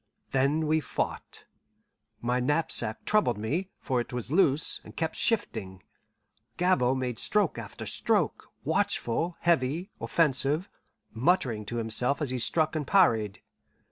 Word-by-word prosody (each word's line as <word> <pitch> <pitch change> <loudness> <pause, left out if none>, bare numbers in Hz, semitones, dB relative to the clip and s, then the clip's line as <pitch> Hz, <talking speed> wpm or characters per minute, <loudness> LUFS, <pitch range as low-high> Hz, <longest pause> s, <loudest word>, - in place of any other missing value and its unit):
Then 140 +4 +1
we 155 +1 +2
fought. - - -4 0.8
My 125 +1 0
knapsack 125 -5 0
troubled 210 - +2
me, 155 - -2
for 125 -2 0
it - - -8
was 125 0 -4
loose, 155 -4 +4
and - - -13
kept 160 -1 -2
shifting. 95 - -1 0.7
Gabord 135 -8 +2
made 125 -3 -3
stroke 205 -6 +1
after - - -8
stroke, - - 0 0.2
watchful, 165 +9 -1
heavy, 170 - +1
offensive, 150 +2 +1 0.5
muttering 120 - +1
to 120 - -4
himself 120 +4 0
as 145 -5 -2
he 130 - -2
struck 155 +6 +1
and 150 -3 -2
parried. 115 - +3
140 Hz, 130 wpm, -28 LUFS, 120-165 Hz, 0.8 s, loose